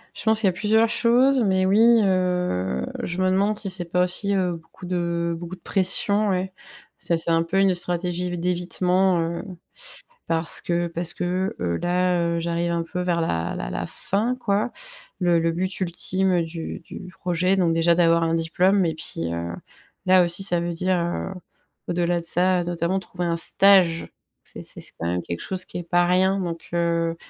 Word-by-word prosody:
Je -, -, -3 dB
pense 220 Hz, 0 st, +3 dB
qu'il 210 Hz, -, +2 dB
y -, -, +5 dB
a -, -, -2 dB
plusieurs 220 Hz, +4 st, +2 dB
choses, 250 Hz, +3 st, +3 dB
mais 190 Hz, -3 st, +1 dB
oui, 225 Hz, +4 st, +5 dB
heu, 180 Hz, -, 0 dB, 0.2 s
je 175 Hz, +2 st, -3 dB
me 185 Hz, -, +2 dB
demande 200 Hz, +3 st, +1 dB
si 200 Hz, -2 st, -2 dB
c'est 185 Hz, -1 st, +1 dB
pas 180 Hz, 0 st, +3 dB
aussi, 200 Hz, +3 st, -1 dB
heu, 180 Hz, -2 st, 0 dB
beaucoup 165 Hz, +2 st, -12 dB
de 170 Hz, -1 st, -2 dB
beaucoup 175 Hz, +2 st, -8 dB
de -, -, -28 dB
pression 200 Hz, +2 st, +2 dB
ouais. 185 Hz, 0 st, -2 dB, 0.4 s
Ça 170 Hz, -, -1 dB
c'est 165 Hz, -, -1 dB
un 165 Hz, 0 st, +2 dB
peu 175 Hz, +4 st, -1 dB
une 195 Hz, -2 st, +3 dB
stratégie 180 Hz, 0 st, -2 dB
vi 175 Hz, -, -4 dB
d'évitement, 180 Hz, +1 st, +1 dB
heu, 165 Hz, +1 st, -3 dB, 0.8 s
parce 165 Hz, 0 st, 0 dB
que 175 Hz, 0 st, -1 dB
parce 170 Hz, 0 st, -2 dB
que, 185 Hz, +2 st, -2 dB
heu, 85 Hz, -1 st, -1 dB
là, 180 Hz, 0 st, +1 dB, 0.2 s
heu, -, -, -1 dB
j'arrive 170 Hz, 0 st, -2 dB
un 170 Hz, 0 st, -1 dB
peu 180 Hz, +2 st, -5 dB
vers 175 Hz, -2 st, 0 dB
la 85 Hz, -, -2 dB
la -, -, -5 dB
la -, -, -4 dB
fin 225 Hz, +6 st, -1 dB
quoi, 215 Hz, -1 st, -1 dB, 0.5 s
le 175 Hz, -2 st, +2 dB
le 165 Hz, 0 st, 0 dB
but 185 Hz, +3 st, -3 dB
ultime 185 Hz, 0 st, +2 dB
du 165 Hz, 0 st, -6 dB
du 180 Hz, +2 st, -10 dB
projet 180 Hz, +2 st, 0 dB
donc 170 Hz, -3 st, +2 dB
déjà 165 Hz, +1 st, +3 dB
d'avoir 170 Hz, -1 st, +3 dB
un 165 Hz, 0 st, 0 dB
diplôme 180 Hz, +4 st, +2 dB
et 165 Hz, -, -1 dB
puis, 85 Hz, -, -3 dB
heu, 85 Hz, 0 st, -4 dB, 0.5 s
là 185 Hz, 0 st, +5 dB
aussi 175 Hz, +2 st, +1 dB
ça 175 Hz, -3 st, +4 dB
veut 170 Hz, 0 st, -3 dB
dire, 185 Hz, +2 st, 0 dB
heu, 175 Hz, +3 st, -3 dB, 0.5 s
au-delà 175 Hz, 0 st, 0 dB
de 170 Hz, -, -9 dB
ça, 180 Hz, +1 st, +2 dB
notamment 175 Hz, +2 st, -2 dB
trouver 180 Hz, -1 st, -6 dB
un 170 Hz, -, 0 dB
stage, 180 Hz, -1 st, +6 dB, 0.3 s
c'est -, -, -11 dB
c'est -, -, -7 dB
c'est -, -, -8 dB
quand 85 Hz, -, -3 dB
même 90 Hz, +1 st, -2 dB
quelque 85 Hz, -, -6 dB
chose 185 Hz, -1 st, -2 dB
qui -, -, -8 dB
n'est 175 Hz, -, -5 dB
pas 175 Hz, +1 st, +2 dB
rien 190 Hz, +2 st, +2 dB
donc 170 Hz, -2 st, -5 dB
heu 170 Hz, -1 st, 0 dB
175 Hz, 200 wpm, -23 LUFS, 170-190 Hz, 0.8 s, stage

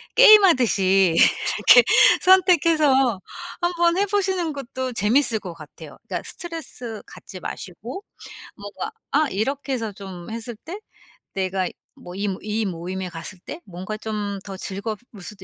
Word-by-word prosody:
게임하듯이 245 Hz, -, +5 dB
이렇게 -, -, +5 dB, 0.4 s
선택해서 310 Hz, -, +4 dB, 0.4 s
한번 345 Hz, 0 st, +1 dB
해 400 Hz, -, +2 dB
보시는 375 Hz, -5 st, -1 dB
것도 260 Hz, -2 st, -5 dB
재밌을 230 Hz, +2 st, +2 dB
것 180 Hz, -4 st, -8 dB
같아요. 155 Hz, -3 st, -13 dB
그러니까 -, -, -4 dB
스트레스 310 Hz, -, -7 dB
갖지 185 Hz, -, -12 dB
마시고 230 Hz, -, -8 dB, 0.5 s
뭔가 205 Hz, -, -7 dB, 0.2 s
아 300 Hz, +1 st, +2 dB
이렇게 270 Hz, +7 st, -3 dB
해서 225 Hz, -4 st, -3 dB
좀 190 Hz, -3 st, -10 dB
했을 230 Hz, +1 st, -6 dB
때 335 Hz, -, -9 dB, 0.6 s
내가 190 Hz, -1 st, -1 dB, 0.3 s
뭐 175 Hz, 0 st, -11 dB
이 205 Hz, +2 st, -2 dB
이 215 Hz, +1 st, -2 dB
모임에 185 Hz, +1 st, -5 dB
갔을 165 Hz, +3 st, -8 dB
때 315 Hz, -, -9 dB
뭔가 190 Hz, +3 st, -7 dB
좀 210 Hz, -2 st, -4 dB
더 195 Hz, -2 st, -7 dB
즐거울 200 Hz, +4 st, -4 dB, 0.3 s
수도 195 Hz, +1 st, -9 dB
220 Hz, 280 characters per minute, -22 LUFS, 195-315 Hz, 0.6 s, 게임하듯이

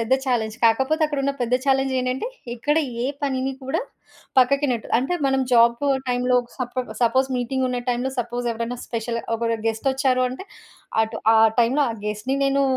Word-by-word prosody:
పెద్ద 230 Hz, +3 st, -1 dB
చాలెంజ్. 225 Hz, -4 st, -1 dB
కాకపోతే 265 Hz, +8 st, +3 dB
అక్కడున్న 280 Hz, -2 st, -1 dB
పెద్ద 245 Hz, +1 st, +1 dB
చాలెంజ్ 270 Hz, -1 st, +2 dB
ఏంటంటే, 255 Hz, -, -2 dB, 0.3 s
ఇక్కడ 290 Hz, +6 st, 0 dB, 0.3 s
ఏ -, -, -1 dB, 0.2 s
పనిని 265 Hz, -1 st, -1 dB
కూడా 270 Hz, +9 st, -1 dB, 0.6 s
పక్కకినెట్ 255 Hz, -2 st, +2 dB
అంటే 270 Hz, +8 st, -1 dB
మనం 270 Hz, 0 st, +2 dB
జాబు 235 Hz, +4 st, +4 dB, 0.2 s
టైంలో 250 Hz, 0 st, +2 dB, 0.2 s
సపొ 255 Hz, 0 st, -3 dB, 0.2 s
సపోజ్ 260 Hz, +3 st, +3 dB
మీటింగ్ 255 Hz, +2 st, -1 dB
ఉన్న 250 Hz, -1 st, -1 dB
టైంలో 245 Hz, +2 st, 0 dB
సపోజ్ 240 Hz, +1 st, -2 dB
ఎవరైనా 235 Hz, +2 st, -4 dB
స్పెషలు 230 Hz, 0 st, -3 dB
ఒకళ్ళు 230 Hz, 0 st, -1 dB
గెస్టొచ్చారు 260 Hz, +3 st, +1 dB
అంటే 265 Hz, +11 st, -8 dB, 0.6 s
అటు 220 Hz, 0 st, -3 dB, 0.2 s
ఆ -, -, +6 dB, 0.2 s
టైంలో 260 Hz, +6 st, +3 dB
ఆ -, -, -2 dB
గెస్ట్‌ని 210 Hz, +6 st, -2 dB
నేను 275 Hz, 0 st, +2 dB
255 Hz, 155 wpm, -23 LUFS, 235-270 Hz, 0.6 s, ఆ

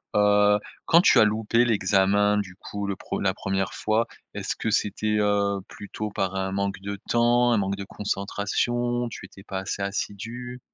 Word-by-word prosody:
Heu, 105 Hz, 0 st, +4 dB, 0.3 s
quand 170 Hz, +1 st, +6 dB
tu -, -, +6 dB
as -, -, +8 dB
loupé 110 Hz, +2 st, +2 dB
l'examen, 100 Hz, -1 st, +3 dB
du 95 Hz, -3 st, -3 dB
coup 100 Hz, 0 st, -5 dB
le 100 Hz, -, -2 dB
pre -, -, -4 dB
la 95 Hz, -1 st, +2 dB
1re 95 Hz, -1 st, -2 dB
fois, 110 Hz, +2 st, +1 dB, 0.3 s
est-ce -, -, -3 dB
que -, -, -2 dB
c'était, 105 Hz, +1 st, 0 dB
heu, 100 Hz, -1 st, +1 dB
plutôt 105 Hz, +1 st, -6 dB
par 95 Hz, -1 st, -2 dB
un 95 Hz, 0 st, -1 dB
manque 100 Hz, 0 st, -2 dB
de 100 Hz, 0 st, -5 dB
temps, 120 Hz, +1 st, +3 dB
un -, -, +3 dB
manque 100 Hz, 0 st, -1 dB
de 100 Hz, -, -6 dB
concentration, 120 Hz, +5 st, -1 dB
tu 95 Hz, -, -9 dB
étais 95 Hz, +1 st, -14 dB
pas 95 Hz, -2 st, -4 dB
assez 95 Hz, +1 st, -4 dB
assidu? 115 Hz, +5 st, -5 dB
105 Hz, 180 wpm, -25 LUFS, 100-110 Hz, 0.3 s, as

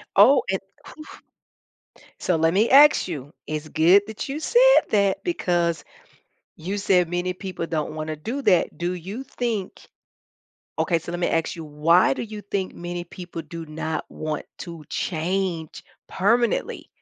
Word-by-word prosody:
Oh, 235 Hz, +8 st, +6 dB
and, 190 Hz, -, 0 dB, 0.4 s
oof. 310 Hz, -, -11 dB, 1.0 s
So 180 Hz, -, 0 dB
let 165 Hz, +1 st, +2 dB
me 215 Hz, +4 st, +3 dB
ask 290 Hz, -2 st, +7 dB
you. 145 Hz, -4 st, -6 dB
It's 155 Hz, 0 st, -4 dB
good 170 Hz, +6 st, +5 dB
that 220 Hz, +5 st, -6 dB
you 285 Hz, +3 st, -4 dB
said -, -, +5 dB
that, 200 Hz, -2 st, +2 dB
because 175 Hz, -, 0 dB, 0.7 s
you 190 Hz, +6 st, -4 dB
said 180 Hz, -3 st, +2 dB
many 175 Hz, +1 st, -1 dB
people 185 Hz, -2 st, -5 dB
don't 155 Hz, -2 st, -3 dB
wanna 155 Hz, 0 st, -4 dB
do 240 Hz, -, -4 dB
that. 180 Hz, -7 st, +2 dB
Do 175 Hz, +1 st, -1 dB
you 195 Hz, +9 st, -6 dB
think 230 Hz, -7 st, -4 dB, 0.9 s
okay, 170 Hz, -, +1 dB
so 170 Hz, +1 st, -7 dB
let 175 Hz, -, -4 dB
me 175 Hz, -, +1 dB
ask 165 Hz, +1 st, -1 dB
you, 165 Hz, -, -7 dB
why 150 Hz, +1 st, +3 dB
do -, -, -5 dB
you 215 Hz, -2 st, -8 dB
think 195 Hz, -2 st, -3 dB
many 175 Hz, 0 st, -5 dB
people 175 Hz, -1 st, -8 dB
do 165 Hz, 0 st, -8 dB
not 160 Hz, +1 st, -4 dB
want 155 Hz, -1 st, -4 dB
to 165 Hz, -4 st, -8 dB
change 170 Hz, -1 st, -2 dB, 0.2 s
permanently? 230 Hz, +4 st, 0 dB
180 Hz, 155 wpm, -23 LUFS, 165-205 Hz, 1.0 s, ask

